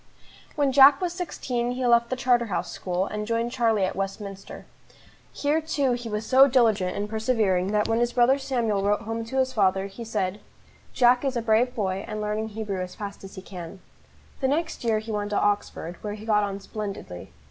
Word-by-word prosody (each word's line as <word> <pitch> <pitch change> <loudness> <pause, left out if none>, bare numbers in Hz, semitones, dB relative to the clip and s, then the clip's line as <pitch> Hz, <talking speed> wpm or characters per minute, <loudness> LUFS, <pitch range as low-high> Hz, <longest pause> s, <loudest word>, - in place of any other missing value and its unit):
WHEN 285 -2 +2
Jack 275 +1 +8
was 355 -2 -2
sixteen 250 -9 -3
he 255 0 -2
left 235 -1 +4
the 255 - -1
Charterhouse 240 -4 0
School, 180 0 -2
and 210 +1 -4
joined 230 +1 -1
Charlie 225 -6 +2
at 185 - -3
Westminster. 195 0 -6 0.7
Here 300 +2 0
too 285 -4 0
he 240 -1 -3
was 210 0 -3
so 265 +3 +6
diligent 220 -8 +2
and 205 +1 -2
persevering, 220 -4 +1
that 210 0 +1
when 225 0 +1
his 240 0 +1
brother 255 +3 +4
Samuel 235 -7 0
wrote 205 +1 +1
home 225 +1 -3
to 265 +4 -5
his 260 0 +1
father, 195 -3 +2
he 200 +4 -8
said: 210 -3 -2 0.5
"Jack 245 0 +4
is 270 -3 -1
a - - 0
brave 230 +3 +2
boy, 195 -3 -2
and 215 0 -4
learning 210 +1 -2
Hebrew 210 -3 -4
as 180 0 -6
fast 200 -1 -7
as 195 +1 -10
he 190 - -9
can." 180 0 -9 0.6
The 265 - +1
next 315 +2 -1
year 225 -2 +2
he 220 +1 -5
went 205 -1 -2
to 205 - 0
Oxford, 205 -4 -1
where 210 -1 -4
he 215 +1 -10
got 210 -2 +3
on 200 -1 -3
splendidly. 195 - -7
220 Hz, 200 wpm, -25 LUFS, 200-245 Hz, 0.7 s, Jack